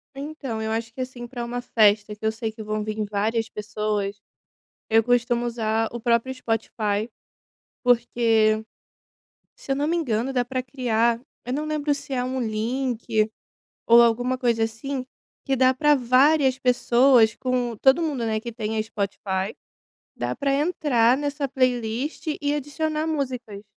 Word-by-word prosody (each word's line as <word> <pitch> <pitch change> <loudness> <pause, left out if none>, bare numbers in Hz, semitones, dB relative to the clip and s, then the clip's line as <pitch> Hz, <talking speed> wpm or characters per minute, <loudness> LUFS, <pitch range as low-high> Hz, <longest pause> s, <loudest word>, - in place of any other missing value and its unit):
Então 275 -5 -5
eu 220 - -2
acho 225 0 -3
que, 255 - -5
assim, 255 -1 -6
para 240 0 -6
uma 240 +1 -3
festa 210 -3 +3
que 210 - -24
eu 220 - +3
sei 220 0 -4
que 220 0 -10
vão 215 0 -2
vir 215 0 -3
várias 220 +2 0
pessoas. 210 -1 -3 0.7
Eu 225 0 +5
costumo 240 0 +1
usar 225 -1 0
o 240 - -5
próprio 235 +3 +1
Spotify, 225 -3 -2 0.8
porque 230 -3 +3 0.9
se 275 - -4
eu - - 0
não 290 +2 0
me 340 - +1
engano 255 -5 -1
dá 250 -2 +1
para 255 +1 -3
criar 235 -3 0 0.3
eu 250 - -3
não 300 +3 -2
lembro 300 -1 0
se 280 -1 -6
é 250 -1 0
um 260 +1 -2
link, 225 -1 -1 0.6
ou 235 +1 +8
alguma 245 +2 +2
coisa 235 -3 +1
assim, 255 +4 -4 0.4
que 270 - +1
dá 260 0 +4
para 295 +3 +4
várias 265 +2 +3
pessoas 245 -2 +4
com 250 -3 -1
todo 265 +8 +4
mundo, 285 -8 -1
né, 220 -1 0
que 235 +1 -6
tenha 220 -1 -2
Spotify 200 -2 -3 0.6
dá - - -2
para 280 -1 0
entrar 275 -6 +2
nessa 290 0 -2
playlist 255 +2 -1 0.2
e 290 0 +1
adicionar 305 +2 -2
músicas. 250 -9 -3
240 Hz, 155 wpm, -24 LUFS, 220-265 Hz, 0.9 s, ou